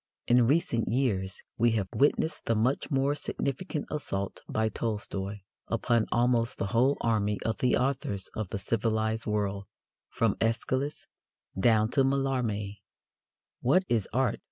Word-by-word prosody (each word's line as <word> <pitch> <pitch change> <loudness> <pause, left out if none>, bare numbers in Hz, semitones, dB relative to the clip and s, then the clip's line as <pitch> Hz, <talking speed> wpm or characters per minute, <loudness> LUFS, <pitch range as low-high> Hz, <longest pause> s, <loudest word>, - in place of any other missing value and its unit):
In 120 -1 +4
recent 130 -5 +2
years 105 -7 -1 0.2
we 115 0 +4
have 105 -4 0
witnessed 150 +3 +2
the 115 - +2
much 120 +6 +1
more 135 -1 +2
significant 145 +2 -3
assault 100 -10 -3
by 110 0 +1
Tolstoy 105 -3 -3 0.3
upon 115 0 +1
almost 120 0 +2
the - - -1
whole 130 +5 +3
army 105 -3 +1
of 110 - -1
the 125 - +3
authors 125 -7 -1
of 110 -4 -4
the - - -3
civilized 110 +1 -1
world 100 -2 -1 0.4
from - - +1
Æschylus 130 +5 -1 0.5
down 110 +2 +3
to 135 - +3
Mallarmé. 125 -7 -1 0.8
_What 175 +10 +4
is 110 -5 +1
Art? 130 -1 +1
115 Hz, 135 wpm, -29 LUFS, 105-130 Hz, 0.8 s, In